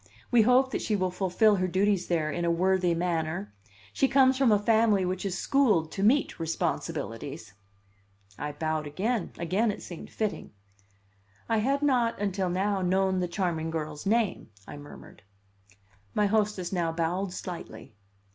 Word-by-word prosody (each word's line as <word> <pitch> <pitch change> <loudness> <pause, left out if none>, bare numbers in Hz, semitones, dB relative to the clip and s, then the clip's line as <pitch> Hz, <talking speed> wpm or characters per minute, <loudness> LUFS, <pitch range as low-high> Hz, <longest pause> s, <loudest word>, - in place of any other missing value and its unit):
We 240 - +6
hope 250 +4 +4
that - - -2
she 215 - 0
will 185 -2 0
fulfil 195 +3 +2
her 185 0 0
duties 190 +1 +1
there 160 -3 0
in 175 - -3
a 170 - +1
worthy 180 0 +2
manner. 160 - -2 0.4
She 270 - +2
comes 265 -1 +4
from 260 -3 +3
a 210 - +5
family 215 -2 +3
which 185 0 -2
is 185 -1 -3
schooled 210 - +2
to 195 - -4
meet 250 +8 +2
responsibilities." 165 0 -4 0.8
I 150 +5 -5
bowed 155 0 -2
again; 200 +7 -2
again 190 +7 0
it 205 - -4
seemed 175 - -9
fitting. 215 - -4 0.9
"I 225 -1 +1
had 275 +6 0
not, 245 -5 +2
until 195 -2 -1
now, 195 +2 0
known 190 +1 +1
the 180 - 0
charming 170 -3 -2
girl's 155 0 -4
name," 220 - 0 0.2
I - - -8
murmured. 145 0 -12 0.9
My 210 - +3
hostess 205 -3 0
now 170 -3 0
bowed 175 +4 -1
slightly. 170 -13 -8
190 Hz, 155 wpm, -28 LUFS, 170-215 Hz, 0.9 s, We